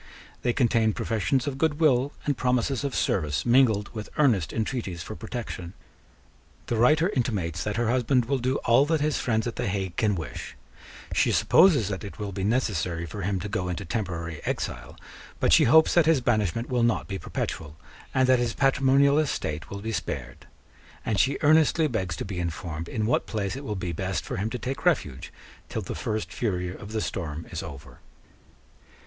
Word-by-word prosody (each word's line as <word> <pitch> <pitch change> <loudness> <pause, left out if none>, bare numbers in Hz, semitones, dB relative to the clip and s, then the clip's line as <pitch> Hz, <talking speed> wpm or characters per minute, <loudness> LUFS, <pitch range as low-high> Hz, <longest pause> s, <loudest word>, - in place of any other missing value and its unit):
They 125 - +1
contain 115 -3 +2
professions 115 +5 0
of 135 -2 -4
good 160 -1 +1
will 140 -3 +3
and 145 - +1
promises 125 +1 0
of 140 -2 -2
service 75 -6 0
mingled 120 -5 +4
with 105 -2 -6
earnest 115 - +3
intreaties 110 -7 -3
for 110 - -7
protection. 110 -7 -6 0.9
The 120 - -1
writer 150 - +4
intimates 100 - -1
that 105 - -2
her 120 0 0
husband 125 +1 +2
will 135 +2 0
do 130 +2 0
all 120 +5 +5
that 160 0 +2
his 150 0 0
friends 110 -2 0
at 120 - -4
the - - -1
Hague 95 -3 -3
can 105 -3 +2
wish: 80 -7 -6 0.6
she - - +3
supposes 150 - +5
that 95 0 -4
it 100 - -8
will 105 -2 -4
be 95 0 -4
necessary 95 -7 0
for 100 +5 -7
him 95 +1 -1
to 105 - -4
go 100 -3 -2
into 90 +2 -4
temporary 85 -5 -4
exile: - - -4 0.4
but - - +3
she - - +7
hopes 160 +6 +6
that 170 -3 +4
his 160 -4 +5
banishment 115 -2 0
will 125 -2 0
not 115 -1 +1
be 95 -1 -4
perpetual, 75 -1 -5 0.3
and 130 -1 +2
that 130 -1 +5
his 120 -2 -1
patrimonial 140 +1 +4
estate 80 - -2
will 100 0 -6
be 110 +2 -3
spared; - - -5 0.6
and 105 -3 0
she 135 +1 +2
earnestly 155 +1 +4
begs 95 - -2
to - - -5
be 95 -3 -4
informed 85 -1 -4
in 110 - -1
what 120 - +1
place 100 -3 -2
it 135 - -7
will 105 -6 -3
be 90 -2 -3
best 95 +3 -3
for - - -4
him 105 +4 -1
to 125 - -4
take 130 +2 -4
refuge 115 - 0 0.4
till - - -3
the - - -5
first 110 0 -3
fury 90 -5 -2
of 100 - -10
the 110 -1 -1
storm 80 -5 -4
is - - -4
over. 70 -2 -10
110 Hz, 190 wpm, -26 LUFS, 95-130 Hz, 0.9 s, she